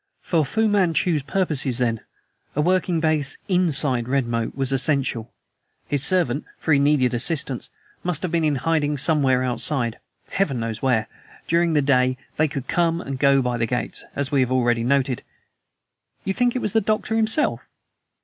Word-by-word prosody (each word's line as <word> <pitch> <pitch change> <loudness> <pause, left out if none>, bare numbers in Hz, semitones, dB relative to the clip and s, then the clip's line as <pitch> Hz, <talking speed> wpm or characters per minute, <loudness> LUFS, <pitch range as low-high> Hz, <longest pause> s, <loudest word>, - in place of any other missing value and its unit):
For 165 -3 +1
Fu 220 +10 0
Manchu's 180 -5 +1
purposes, 145 -6 +1
then, 115 -3 0 0.5
a 150 - +1
working 180 0 +1
base 155 -3 0
INSIDE 150 - +3
Redmoat 120 -4 -1
was 135 -1 -1
essential. 135 -4 0 0.6
His 140 0 -1
servant 155 -6 +2
for 160 - 0
he 140 - +4
needed 140 -3 +2
assistance 135 0 -1 0.3
must 180 -2 0
have 180 - -2
been 170 -1 +1
in 150 -2 +1
hiding 150 +1 0
somewhere 135 -3 +2
outside; 125 -1 -1 0.3
Heaven 150 -10 -1
knows 115 -1 -4
where! 120 -5 +1 0.4
During 170 0 +2
the 150 -2 +2
day 130 -2 +2 0.2
they 155 - +3
could 135 -2 -6
come 170 -1 +1
or 140 - -7
go 135 0 +3
by 125 -1 -1
the 115 0 -1
gates, 125 0 -4
as 140 -1 -2
we 140 - +2
have 130 -1 +1
already 120 -2 +1
noted." 135 0 0 1.0
"You 195 - -1
think 245 +3 +1
it 255 - -2
was 210 - -1
the 225 - +3
Doctor 215 +2 -1
himself?" 225 +7 +1
140 Hz, 170 wpm, -22 LUFS, 125-170 Hz, 1.0 s, he